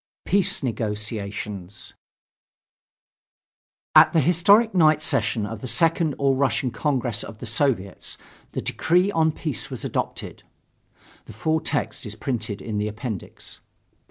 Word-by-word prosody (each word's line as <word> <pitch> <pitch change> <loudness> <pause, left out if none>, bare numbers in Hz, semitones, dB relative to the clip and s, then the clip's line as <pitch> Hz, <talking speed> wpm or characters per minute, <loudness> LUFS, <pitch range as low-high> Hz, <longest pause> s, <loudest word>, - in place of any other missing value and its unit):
PEACE 195 -5 +1
NEGOTIATIONS 105 -4 -4 2.0
At - - +8
the 165 - +4
historic 200 - +4
night 155 -4 +5
session 120 -7 +1
of 110 0 -7
the - - -5
Second 160 +5 +2
All 140 -1 +2
Russian 130 -1 0
Congress 120 -3 -1
of 110 - -9
the 125 - -8
Soviets 115 -5 -1 0.4
the - - -2
decree 180 +4 +2
on 160 -3 +2
peace 150 - -2
was - - -6
adopted. - - -4 0.8
(The - - -11
full 160 0 0
text 145 -5 -2
is 105 - -6
printed 110 -5 -3
in 105 -2 -3
the 105 - -1
Appendix.) 110 -1 -7
125 Hz, 130 wpm, -24 LUFS, 105-160 Hz, 2.0 s, At